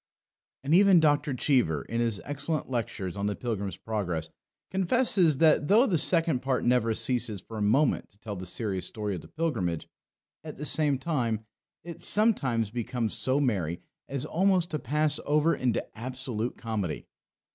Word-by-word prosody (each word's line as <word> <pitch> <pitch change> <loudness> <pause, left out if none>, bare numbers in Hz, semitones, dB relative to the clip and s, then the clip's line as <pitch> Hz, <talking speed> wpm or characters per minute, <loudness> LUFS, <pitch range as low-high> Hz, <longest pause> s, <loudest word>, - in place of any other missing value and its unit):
And 140 +3 0
even 190 0 +7
Dr. 145 -2 +2
Cheever, 120 - +1
in 115 0 -2
his 115 -4 0
excellent 145 0 -2
lectures 100 -6 -3
on 100 0 -2
the 105 - -1
Pilgrim's 100 -6 -4
Progress, 90 -8 -3 0.4
confesses 190 - +3
that 155 -1 +4
though 220 +6 +5
the 180 - +1
Second 165 -5 +2
Part 135 -1 0
never 120 -2 +2
ceases 120 -5 0
for 110 - -11
a - - -3
moment 130 +8 +2
to 100 - -24
tell 105 -2 -6
the 95 -1 -6
serious 95 -1 -2
story 105 -2 -3
of 90 - -5
the - - -14
Pilgrimage, 110 - -2 0.6
at 155 -1 -8
the 150 - -5
same 150 -3 +2
time, 120 -7 -2 0.4
it 170 -1 -9
sometimes 130 - +2
becomes 120 -1 -2
so 130 +6 +1
merry 95 - 0 0.3
as 140 0 -3
almost 185 +1 +2
to 155 - -2
pass 150 +3 0
over 150 +3 +2
into 125 -3 -1
absolute 125 -1 -4
comedy. 105 -9 -3
125 Hz, 165 wpm, -28 LUFS, 110-155 Hz, 0.6 s, even